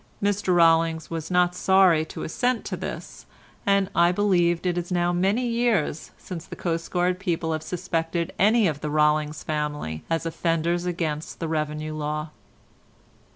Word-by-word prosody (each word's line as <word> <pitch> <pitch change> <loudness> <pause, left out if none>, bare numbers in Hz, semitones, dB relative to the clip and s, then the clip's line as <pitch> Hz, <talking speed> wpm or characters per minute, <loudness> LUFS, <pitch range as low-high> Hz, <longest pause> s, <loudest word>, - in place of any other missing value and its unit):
Mr 205 -2 +1
Rollings 165 -1 +3
was 165 -1 -4
not 180 -1 +3
sorry 185 -3 +4
to - - -7
assent 245 +7 -1
to - - -3
this, - - -7 0.4
and 200 -1 +3
I 170 +1 +4
believe 180 -3 +2
it 180 -1 +1
is 175 +1 -4
now 175 0 +1
many 195 +8 +1
years 230 -10 0
since 175 -3 -8
the - - -8
coastguard 175 +2 -1
people 170 -4 -1
have 155 -1 -2
suspected 165 0 -2
any 215 +3 +4
of 150 -3 -3
the 150 - -3
Rollings 150 0 +1
family 150 - -3
as 165 0 -1
offenders 170 +1 0
against 160 -3 -3
the 165 - -2
revenue 155 0 -2
law. 150 0 -3
170 Hz, 155 wpm, -25 LUFS, 155-180 Hz, 0.4 s, sorry